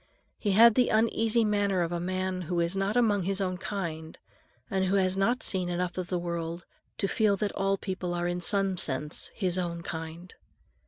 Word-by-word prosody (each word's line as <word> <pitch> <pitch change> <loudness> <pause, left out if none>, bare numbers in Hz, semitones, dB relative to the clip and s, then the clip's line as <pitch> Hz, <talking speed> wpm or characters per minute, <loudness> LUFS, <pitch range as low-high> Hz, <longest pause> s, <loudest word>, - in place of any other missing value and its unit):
He 205 -3 0
had 230 +3 +8
the 250 +2 +3
uneasy 225 +1 +2
manner 205 -3 +1
of 165 - -3
a 175 - -1
man 185 +1 -2
who 175 -1 0
is 170 +2 0
not 195 +4 0
among 210 -5 +3
his 195 +2 -1
own 185 -2 -2
kind, 165 -7 -5 0.5
and 190 -3 0
who 190 +2 +1
has 185 -1 +2
not 230 +6 +1
seen 185 -2 0
enough 175 0 -2
of 185 -1 -3
the 180 - -1
world 170 0 -4 0.3
to 195 - 0
feel 205 -1 +2
that 205 0 -1
all 195 0 0
people 185 -3 -4
are 175 0 -1
in 175 0 -2
some 195 0 +1
sense 150 0 -2
his 185 -3 +1
own 170 -1 -3
kind. 165 +2 -7
185 Hz, 200 wpm, -28 LUFS, 175-200 Hz, 0.5 s, had